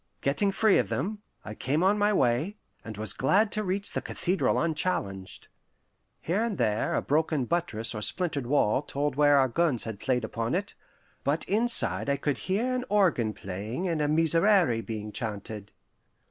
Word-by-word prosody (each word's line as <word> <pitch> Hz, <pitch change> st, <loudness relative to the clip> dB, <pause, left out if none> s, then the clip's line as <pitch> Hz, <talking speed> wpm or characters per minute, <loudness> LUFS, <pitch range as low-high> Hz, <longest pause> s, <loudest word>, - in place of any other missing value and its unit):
Getting 195 Hz, +9 st, +1 dB
free 210 Hz, +1 st, +3 dB
of -, -, -1 dB
them, 205 Hz, +2 st, -3 dB, 0.2 s
I 110 Hz, -, -6 dB
came 145 Hz, +9 st, -1 dB
on 195 Hz, +2 st, +4 dB
my 210 Hz, 0 st, +2 dB
way, 150 Hz, -, +1 dB, 0.3 s
and 110 Hz, -2 st, -8 dB
was 105 Hz, -2 st, -2 dB
glad 200 Hz, -, +2 dB
to 215 Hz, -, -2 dB
reach 195 Hz, +1 st, -2 dB
the -, -, -3 dB
cathedral 185 Hz, +2 st, 0 dB
unchallenged. 150 Hz, -, -3 dB, 0.7 s
Here 180 Hz, +6 st, -1 dB
and 225 Hz, -5 st, -2 dB
there 110 Hz, -2 st, 0 dB
a -, -, 0 dB
broken 155 Hz, -2 st, 0 dB
buttress 120 Hz, -9 st, -2 dB
or 105 Hz, -, -4 dB
a -, -, -8 dB
splintered 145 Hz, -, +1 dB
wall 130 Hz, -3 st, +2 dB
told 145 Hz, -1 st, -3 dB
where 145 Hz, 0 st, +5 dB
our 135 Hz, -1 st, +4 dB
guns 145 Hz, -2 st, 0 dB
had 110 Hz, -3 st, -6 dB
played 125 Hz, -1 st, 0 dB
upon 115 Hz, +3 st, -2 dB
it, 200 Hz, +2 st, -3 dB, 0.5 s
but 145 Hz, +3 st, 0 dB
inside 225 Hz, -7 st, +2 dB
I 140 Hz, -, +1 dB
could 140 Hz, 0 st, -2 dB
hear 230 Hz, +7 st, +1 dB
an 250 Hz, 0 st, -1 dB
organ 175 Hz, -, +2 dB
playing 105 Hz, -, -5 dB
and 165 Hz, -3 st, -1 dB
a 150 Hz, -, +1 dB
Miserere 165 Hz, -, +3 dB
being 110 Hz, -2 st, -6 dB
chanted. 105 Hz, -2 st, -6 dB
150 Hz, 175 wpm, -27 LUFS, 115-190 Hz, 0.7 s, where